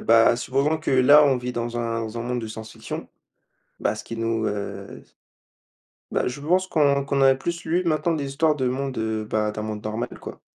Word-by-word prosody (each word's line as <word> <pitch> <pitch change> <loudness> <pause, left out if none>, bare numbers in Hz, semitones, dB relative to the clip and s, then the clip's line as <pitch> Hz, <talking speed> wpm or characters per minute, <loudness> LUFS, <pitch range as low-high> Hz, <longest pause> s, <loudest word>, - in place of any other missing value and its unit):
bah, 115 0 +5
supposons 140 +5 0
que 155 - -3
là 135 +3 +7
on 135 -2 +3
vit 125 0 -4
dans 120 0 -3
un 115 -1 -1
dans 110 +1 -5
un - - -3
monde 125 +1 -2
de 110 - -6
science-fiction. 110 0 -7 0.7
Bah, - - +1
ce - - -8
qui 115 - -7
nous, 115 -1 -1
heu 100 -1 -5 1.1
bah - - 0
je 125 +3 -4
pense 180 +6 +1
qu'on 140 -5 +2
qu'on 140 0 0
a 135 0 +7
plus 170 +5 -4
lu 170 +3 +1
maintenant 165 0 +1
des 145 -3 -2
histoires 150 +3 +2
de 130 -3 0
monde, 135 +1 -2
heu, 110 -1 -2
ben 105 0 0
d'un 105 - -5
monde 105 -1 -5
normal 110 +2 -2
quoi. - - -8
125 Hz, 210 wpm, -24 LUFS, 115-145 Hz, 1.1 s, là